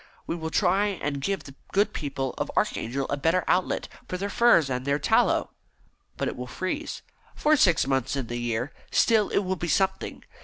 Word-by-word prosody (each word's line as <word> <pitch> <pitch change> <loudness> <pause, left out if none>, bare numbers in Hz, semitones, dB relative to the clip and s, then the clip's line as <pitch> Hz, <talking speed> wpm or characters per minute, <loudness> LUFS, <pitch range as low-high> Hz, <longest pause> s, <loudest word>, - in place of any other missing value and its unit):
We - - -2
will 160 -1 -4
try 190 +4 +2
and 150 -8 -3
give 195 +6 -1
the 135 - -11 0.2
good 200 +2 +2
people 135 -3 -3
of - - -2
Archangel 135 +4 0
a 145 - 0
better 165 +6 +2
outlet 185 0 +1 0.2
for 180 - -3
their 200 +2 -3
furs 235 - +5
and 125 -1 -2
their 140 +1 +1
tallow." 145 - +2 0.7
"But - - -1
it - - -3
will 125 0 -6
freeze." 185 - -4 0.3
"For 305 +1 +4
six 180 - +4
months 135 -1 0
in 135 -3 -2
the 120 +1 -4
year. 120 +2 -2 0.2
Still, 220 -3 +3
it - - +1
will 190 0 -2
be 175 - -3
something. 190 +2 0
165 Hz, 195 wpm, -26 LUFS, 135-195 Hz, 0.7 s, furs